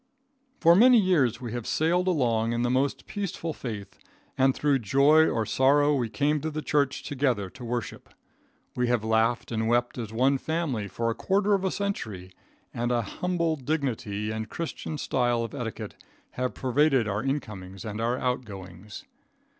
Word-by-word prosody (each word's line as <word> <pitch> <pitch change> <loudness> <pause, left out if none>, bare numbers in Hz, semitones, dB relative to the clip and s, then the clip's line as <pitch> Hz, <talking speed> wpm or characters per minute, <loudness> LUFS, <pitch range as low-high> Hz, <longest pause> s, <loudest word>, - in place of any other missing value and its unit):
For 170 0 +6
many 245 +5 +7
years 170 - +2
we 120 -3 -6
have 120 -1 -5
sailed 175 +4 +1
along 120 -9 +1
in 120 +1 0
the 120 - +1
most 135 +2 0
peaceful 190 -5 -4
faith, 110 -8 -7 0.4
and 135 0 +3
through 145 -2 +2
joy 140 +8 +5
or 115 -1 0
sorrow 145 +5 +3
we 125 -5 0
came 150 +4 0
to 160 - -2
the 155 0 -5
church 140 -1 0
together 125 -9 -1
to - - -11
worship. 120 -1 -4 0.7
We 125 0 +1
have 120 -2 +1
laughed 110 +2 +1
and 110 -1 -1
wept 120 +1 +1
as 110 -3 -5
one 130 +4 +2
family 155 -11 -2
for 115 +4 -2
a - - -1
quarter 200 - +1
of 195 -1 +1
a 190 - +1
century, 110 - -4 0.4
and 120 +1 -1
an 120 -1 +1
humble 170 - -1
dignity 125 -8 -2
and 110 0 -4
Christian 160 -1 -5
style 120 -4 0
of 115 - -6
etiquette 120 -5 -6 0.3
have 125 0 -3
pervaded 130 -2 +2
our 100 +1 -1
incomings 100 -9 -4
and 105 +1 -4
our 120 +2 0
outgoings. 105 -7 -5
125 Hz, 170 wpm, -27 LUFS, 115-150 Hz, 0.7 s, many